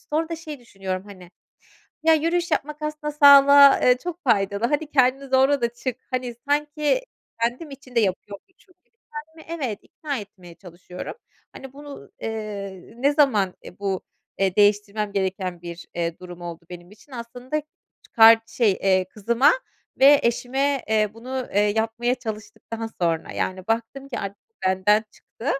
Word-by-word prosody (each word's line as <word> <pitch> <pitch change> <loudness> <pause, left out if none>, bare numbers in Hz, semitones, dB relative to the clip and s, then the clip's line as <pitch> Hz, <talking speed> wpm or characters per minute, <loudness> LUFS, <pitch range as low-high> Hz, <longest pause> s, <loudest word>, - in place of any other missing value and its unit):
sonra 320 +2 0
da 330 - -4
şey 310 -3 -8
düşünüyorum, 195 -4 -5
hani, 185 -3 -13 0.7
"Ya, 320 0 +5
yürüyüş 340 +2 0
yapmak 300 +1 -2
aslında 300 0 -4
sağlığa, 280 -1 +8
eee, 250 0 +5
çok 350 -1 -5
faydalı, 200 -2 +1
hani, 295 +3 -1
kendini 265 0 +2
zorla 265 +1 +3
da 235 - +1
çık." 250 0 -4
hani, 250 -2 -3
sanki 295 +9 +1 0.4
kendim 250 +7 -2
için 270 -2 -13
de 235 - +4
yapıyormuşum 210 - -5
gibi. - - -45 0.2
Kendimi 320 +1 -7
evet, 215 -5 -3
ikna 285 -5 -5
etmeye 185 -4 -12
çalışıyorum. 180 0 -9 0.4
Hani, 270 -1 -11
bunu, 285 0 -11
eee, 210 -3 -6
ne 275 +4 +2
zaman, 220 - +2
e, 180 - -12
bu, 195 -2 -2 0.4
eee, 190 -1 0
değiştirmem 205 0 +2
gereken 190 -2 -2
bir, 170 0 -8
eee, 170 -1 -2
durum 180 -1 -11
oldu 170 -1 -8
benim 175 +1 -10
için? 240 +6 -19
Aslında 250 +5 -5 0.4
çıkar 225 0 +7
şey, 225 -2 +2
eee, 185 -1 +1
kızıma 235 +7 +3 0.5
ve 280 +1 +7
eşime, 265 +4 0
eee, 215 -2 +2
bunu, 255 +3 -5
eee, 205 - +4
yapmaya 225 +3 0
çalıştıktan 225 -1 -7
sonra, 165 -2 -1
yani, 185 0 -3
baktım 230 +5 -3
ki 255 - -5
artık 200 0 -5
bu 450 - -50
benden 205 +4 +3
çıktı, 230 - -13
230 Hz, 155 wpm, -23 LUFS, 200-280 Hz, 0.7 s, sağlığa